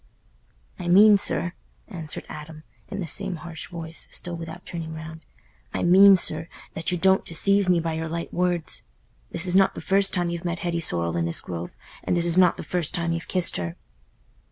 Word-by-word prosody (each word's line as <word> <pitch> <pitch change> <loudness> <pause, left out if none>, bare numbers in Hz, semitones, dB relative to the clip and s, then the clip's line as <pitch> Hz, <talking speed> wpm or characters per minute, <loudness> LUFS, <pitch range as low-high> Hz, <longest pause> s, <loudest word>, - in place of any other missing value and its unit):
"I 175 - -5
mean, 205 +4 +7
sir"—answered 170 -3 -3
Adam, 155 +1 -10 0.2
in 200 - -6
the 185 - -3
same 195 +3 0
harsh 165 -1 -8
voice, 165 -1 -5
still 175 -1 -1
without 165 -1 -8
turning 160 -2 -6
round—"I 160 - -9
mean, 195 +3 +8
sir, 160 -2 -1 0.3
that 165 - -3
you 180 - 0
don't 190 +2 +3
deceive 200 +3 +2
me 175 -1 +4
by 165 -1 -2
your 160 0 -4
light 170 +1 -5
words. 175 -2 -1 0.5
This 175 - -5
is 180 0 -1
not 195 0 +4
the - - -6
first 195 0 +1
time 175 -2 0
you've 170 -1 -5
met 175 0 -2
Hetty 170 -1 -1
Sorrel 85 - -1
in 85 - 0
this 85 - 0
grove, 85 -1 -7 0.3
and 180 - 0
this 170 - +1
is 170 -1 +1
not 180 -2 +4
the - - -6
first 180 -1 -1
time 170 -2 -1
you've 165 0 -5
kissed 180 -2 +3
her." 85 -1 -4
170 Hz, 195 wpm, -24 LUFS, 160-180 Hz, 0.5 s, mean